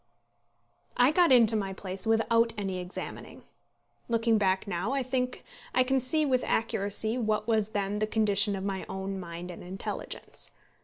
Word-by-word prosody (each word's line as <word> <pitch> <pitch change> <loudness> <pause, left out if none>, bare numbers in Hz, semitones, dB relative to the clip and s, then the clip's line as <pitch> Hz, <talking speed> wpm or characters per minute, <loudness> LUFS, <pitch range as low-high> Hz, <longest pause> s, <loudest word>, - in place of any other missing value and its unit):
I 250 +3 +5
got 345 -1 +4
into 230 -3 +6
my 195 -2 -1
place 190 +1 -3
without 230 +1 +3
any 195 -3 -3
examining. 180 +1 -7 0.7
Looking 230 -1 +2
back 190 -1 +1
now, 195 +6 -2
I 275 -1 0
think 250 0 -2 0.3
I 255 - +5
can 265 +1 +1
see 300 +5 +3
with 255 -3 +1
accuracy 220 +1 0
what 215 -1 0
was 220 -2 +1
then 205 -1 -2
the 215 - 0
condition 205 -2 +2
of 190 - -5
my 195 -1 -3
own 190 0 -4
mind 175 0 -7
and 175 - -10
intelligence. 185 +2 -4
215 Hz, 160 wpm, -29 LUFS, 195-235 Hz, 0.7 s, into